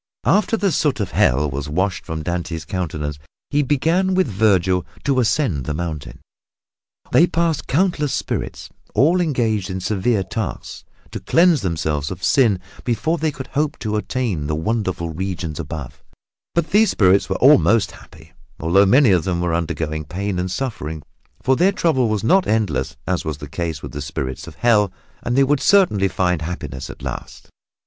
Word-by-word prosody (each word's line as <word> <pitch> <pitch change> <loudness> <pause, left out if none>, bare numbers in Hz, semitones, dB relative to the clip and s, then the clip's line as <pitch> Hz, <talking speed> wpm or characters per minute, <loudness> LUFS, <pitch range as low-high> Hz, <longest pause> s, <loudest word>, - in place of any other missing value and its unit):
After 215 +2 +3
the 200 -3 +1
soot 150 -5 +1
of 100 - -2
Hell 70 +5 +3
was 70 +2 -4
washed 95 +4 -1
from 80 -2 -4
Dante's 85 -1 -3
countenance 75 -5 -4 0.3
he 145 0 +3
began 165 +7 +1
with 185 - +3
Vergil 95 -4 +2 0.2
to 135 -2 +2
ascend 115 - +1
the 75 - -2
mountain. 80 -3 -5 0.9
They 170 - +5
passed 165 -4 0
countless 150 -2 +1
spirits - - -4 0.2
all 160 +11 +4
engaged 115 - 0
in 95 0 -3
severe 100 +2 0
tasks, 100 +1 -5 0.3
to - - -5
cleanse 170 -2 +3
themselves 80 -5 -1
of 90 -1 -7
sin 115 -10 +3 0.2
before 155 +7 0
they 160 +1 +1
could 135 -2 -7
hope 150 +1 -1
to 110 -1 -3
attain 105 - -2
the 75 - -1
wonderful 95 -2 -2
regions 85 -2 -4
above; 75 -4 -7 0.5
but 170 -2 0
these 215 +2 +5
spirits 95 -1 +3
were - - 0
almost 115 -6 +4
happy, 80 0 -16 0.3
although 90 +5 +4
many 125 +2 +5
of 90 -4 +3
them 90 -1 -1
were 85 -1 0
undergoing 80 -2 -2
pain 95 +5 -3
and 90 +1 -2
suffering, 80 - -4 0.4
for 130 - +3
their 180 +7 +3
trouble 140 - +1
was 105 -1 -1
not 190 +12 +3
endless 80 -10 0
as 90 -3 -1
was 80 -3 -4
the 75 - -8
case 80 0 -4
with - - -6
the 70 - -6
spirits 65 -2 -5
of - - -10
Hell, 105 -5 +3 0.3
and 120 +2 -1
they 135 - +6
would 140 +1 +2
certainly 175 - +4
find 90 -3 0
happiness 80 -5 -5
at - - -10
last. - - -7
100 Hz, 170 wpm, -20 LUFS, 80-135 Hz, 0.9 s, they